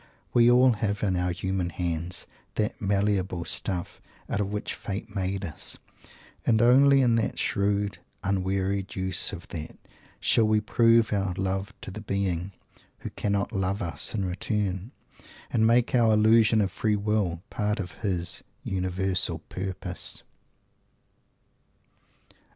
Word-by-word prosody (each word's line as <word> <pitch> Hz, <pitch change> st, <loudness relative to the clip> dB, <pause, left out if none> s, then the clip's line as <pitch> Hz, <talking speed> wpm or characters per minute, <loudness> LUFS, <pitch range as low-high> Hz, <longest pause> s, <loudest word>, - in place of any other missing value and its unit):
That -, -, +4 dB
is 120 Hz, 0 st, +7 dB
all 125 Hz, +1 st, +6 dB
we 115 Hz, -, -2 dB
have 105 Hz, -1 st, -1 dB
in 95 Hz, -3 st, +1 dB
our 90 Hz, 0 st, 0 dB
human 95 Hz, 0 st, -2 dB
hands, 85 Hz, 0 st, -2 dB, 0.3 s
that 105 Hz, -, -1 dB
malleable 100 Hz, -3 st, 0 dB
stuff 90 Hz, -3 st, -3 dB, 0.3 s
out 100 Hz, -, -1 dB
of 100 Hz, 0 st, -2 dB
which 105 Hz, 0 st, -3 dB
Fate 100 Hz, +1 st, -6 dB
made 95 Hz, 0 st, -1 dB
us 80 Hz, -4 st, -3 dB, 0.7 s
and 110 Hz, -2 st, +3 dB
only 135 Hz, +3 st, +6 dB
in 120 Hz, -2 st, +3 dB
the 115 Hz, -, -1 dB
shrewd, 100 Hz, 0 st, 0 dB, 0.2 s
unwearied 95 Hz, 0 st, -1 dB
use 95 Hz, -1 st, -1 dB
of -, -, -8 dB
that 80 Hz, -1 st, -7 dB, 0.4 s
shall 115 Hz, -, +3 dB
we 110 Hz, 0 st, +4 dB
prove 115 Hz, +1 st, +3 dB
our 95 Hz, -3 st, 0 dB
love 95 Hz, +2 st, -2 dB
to -, -, -4 dB
the 110 Hz, +3 st, -7 dB
Being 100 Hz, -3 st, -1 dB, 0.5 s
"who -, -, -6 dB
cannot 100 Hz, -1 st, -1 dB
love 95 Hz, +1 st, -1 dB
us 85 Hz, +5 st, 0 dB
in 100 Hz, -3 st, 0 dB
return" 95 Hz, +2 st, -2 dB, 0.6 s
and 110 Hz, -2 st, +3 dB
make 120 Hz, +1 st, +3 dB
our 115 Hz, -3 st, +5 dB
illusion 110 Hz, 0 st, +5 dB
of 100 Hz, -, 0 dB
Free 105 Hz, -2 st, 0 dB
Will 100 Hz, -5 st, 0 dB
part 105 Hz, 0 st, -1 dB
of 90 Hz, -3 st, -4 dB
his 90 Hz, -4 st, -1 dB, 0.2 s
universal 95 Hz, -2 st, -1 dB
Purpose! 95 Hz, -1 st, -3 dB
100 Hz, 140 wpm, -27 LUFS, 95-110 Hz, 0.7 s, is